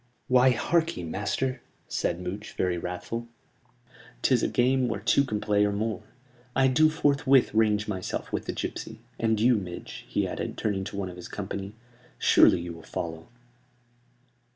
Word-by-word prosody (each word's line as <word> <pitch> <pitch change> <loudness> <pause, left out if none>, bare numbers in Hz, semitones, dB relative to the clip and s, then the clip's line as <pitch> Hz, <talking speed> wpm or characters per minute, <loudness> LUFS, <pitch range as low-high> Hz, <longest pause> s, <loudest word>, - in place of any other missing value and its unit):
"Why, 125 0 +5
harkee, 165 - 0
master," 125 +9 -2 0.3
said 85 - -1
Much, 100 +4 -5
very 90 -1 0
wrathful. 90 +7 -5 1.0
"This - - +2
is - - +4
a - - +2
game 130 +1 +2
where 115 -4 -2
two 125 +6 +3
can 110 -6 -2
play 105 -1 +2
or 105 - +2
more. 105 -1 -2 0.5
I 135 0 +4
do 155 +5 +5
forthwith 140 -4 +3
range 105 -1 +2
myself 95 -3 -4
with - - -2
the - - -2
gipsy; 110 0 -5 0.2
and 110 -1 +1
you, 120 +1 +4
Midge," 90 -3 -7
he - - 0
added, - - -4
turning 100 -3 -1
to 100 - -6
one 95 -2 -2
of 90 - -10
his 90 - -8
company, 100 0 -5 0.4
"surely - - +5
you 85 0 -6
will 80 - -11
follow?" 80 0 -5
105 Hz, 165 wpm, -27 LUFS, 95-125 Hz, 1.0 s, Why